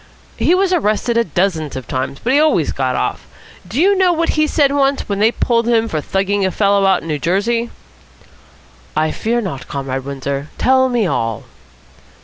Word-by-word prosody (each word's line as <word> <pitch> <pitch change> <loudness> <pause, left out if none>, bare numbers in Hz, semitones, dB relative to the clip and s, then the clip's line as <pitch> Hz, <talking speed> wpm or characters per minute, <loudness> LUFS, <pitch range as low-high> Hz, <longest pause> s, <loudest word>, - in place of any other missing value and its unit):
"He 350 - +3
was 375 0 +1
arrested 235 - 0
dozens 170 -5 0
of 130 -2 -6
times, 130 +1 -3
but 255 - +1
he 285 - +5
always 300 - +2
got 130 -2 -1
off. - - -3 0.4
Do 220 +10 -3
you 395 +4 +4
know 375 -2 +3
what 335 -1 0
he 310 0 +2
said 285 -3 +2
once, 280 -1 +1
when 200 -1 -2
they 220 +2 +4
pulled 235 -1 0
him 230 -1 +2
for 155 -7 -2
thugging 195 +4 -1
a 190 - +2
fellow 200 0 +2
out 190 - +2
in - - -8
New 150 -2 -2
Jersey?" 230 +8 0 1.3
"I 155 0 +1
fear 235 +2 -1
not, 170 - -6
Comrade 135 -1 -4
Windsor. 140 +1 -4
Tell 260 0 +3
me 240 -4 +1
all." 115 - -2
205 Hz, 185 wpm, -17 LUFS, 155-260 Hz, 1.3 s, he